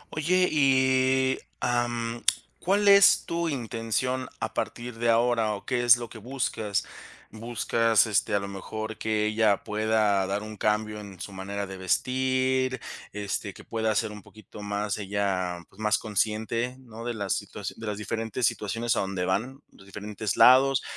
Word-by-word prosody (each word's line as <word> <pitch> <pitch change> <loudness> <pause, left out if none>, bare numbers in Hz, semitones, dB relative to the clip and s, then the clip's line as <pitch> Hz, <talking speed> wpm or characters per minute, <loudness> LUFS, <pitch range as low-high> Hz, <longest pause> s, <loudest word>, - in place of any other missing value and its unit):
Oye, 180 +4 +2
y, 130 -2 +3 0.2
am, 120 -1 -1 0.4
¿cuál 200 +3 +1
es 200 0 +7
tu 170 0 -1
intención 125 0 -2
a - - -3
partir 120 -1 -4
de 120 0 +1
ahora?, 115 -2 +3
o, 100 - -10
¿qué 125 -2 0
es 120 0 +7
lo 120 - -6
que 110 - -11
buscas? 110 -4 -2 0.5
¿Buscas 115 -1 +1
este 105 -1 +1
a - - +3
lo 100 - -5
mejor 110 +3 -6
que 110 -1 0
ella 105 -1 +2
pueda 105 -2 +1
dar 100 +2 -2
un 110 0 -8
cambio 105 +1 0
en 100 -3 -11
su 100 - -7
manera 100 +2 -4
de 95 0 -8
vestir, 130 +5 +1 0.3
este 105 -1 -4
que - - -12
pueda 110 -1 -1
ser 105 - 0
un 105 -1 -9
poquito 110 +1 -13
más 105 0 -2
ella, 95 -3 -1
pues 95 - -22
más 105 0 +3
consciente?, 110 +3 -1
¿no? 115 -2 -10
De 120 -1 -2
la 100 -3 -4
situación - - -4
de 115 - -6
las 105 -1 -3
diferentes 115 +2 -2
situaciones 115 +4 0
a - - 0
donde 95 -2 -2
van, 125 +9 -2
los 95 - -18
diferentes 105 0 -4
lados, 135 +1 +6
110 Hz, 165 wpm, -27 LUFS, 105-125 Hz, 0.5 s, es